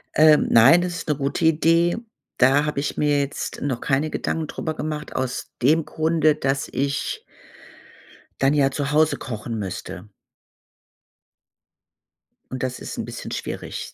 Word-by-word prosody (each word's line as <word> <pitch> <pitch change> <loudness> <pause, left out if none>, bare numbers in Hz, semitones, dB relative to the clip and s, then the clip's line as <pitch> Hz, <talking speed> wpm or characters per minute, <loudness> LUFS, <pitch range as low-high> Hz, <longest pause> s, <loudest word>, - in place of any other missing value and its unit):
Ähm, 155 -1 +6
nein, 135 +10 +7
das 175 -1 -3
ist 165 - -6
'ne 150 - +2
gute 140 +4 -1
Idee. 165 +3 +3 0.4
Da 135 +4 +4
habe 150 -2 -2
ich 140 - -3
mir 145 -1 +2
jetzt 140 0 -4
noch 130 -4 -2
keine 145 +3 0
Gedanken 160 0 -2
drüber 155 +1 -4
gemacht 150 -1 -5
aus 130 -1 -3
dem 155 +5 +3
Grunde, 155 -1 +1
dass 140 -2 -1
ich 140 +1 -2 1.2
dann 135 +1 +3
ja 140 -2 +3
zu 145 +1 -2
Hause 155 +1 +3
kochen 115 -1 -5
müsste. 95 -1 -6 2.4
Und 130 0 -4
das 125 -1 -3
ist - - -7
'n - - -3
bisschen - - -7
schwierig. - - -6
145 Hz, 145 wpm, -23 LUFS, 135-155 Hz, 2.4 s, nein